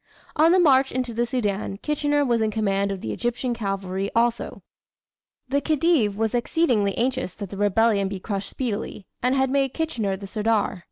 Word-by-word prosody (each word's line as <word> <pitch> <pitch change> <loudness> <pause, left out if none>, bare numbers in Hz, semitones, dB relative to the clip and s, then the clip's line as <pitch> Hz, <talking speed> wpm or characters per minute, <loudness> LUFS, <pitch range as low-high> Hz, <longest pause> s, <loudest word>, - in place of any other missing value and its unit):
On 320 +2 +5
the 370 - +5
march 275 -6 +4
into 250 -2 -2
the 240 +1 0
Soudan, 205 -5 -2
Kitchener 290 +3 0
was 235 -3 +1
in 220 - +2
command 200 -2 0
of 195 -2 -5
the - - -3
Egyptian 240 +1 -2
Cavalry 195 -3 -3
also. 235 0 0 0.8
The 280 +2 0
Khedive 300 - +2
was 220 0 0
exceedingly 240 - +1
anxious 255 -5 -1
that 200 -3 -7
the 200 - -6
rebellion 205 0 +2
be 195 0 -5
crushed 200 0 -4
speedily, 215 -5 -4 0.2
and 250 +2 +2
had 265 -1 +1
made 270 -2 +1
Kitchener 225 -12 -1
the 200 - -8
"sirdar." 210 -1 0
230 Hz, 175 wpm, -24 LUFS, 200-265 Hz, 0.8 s, On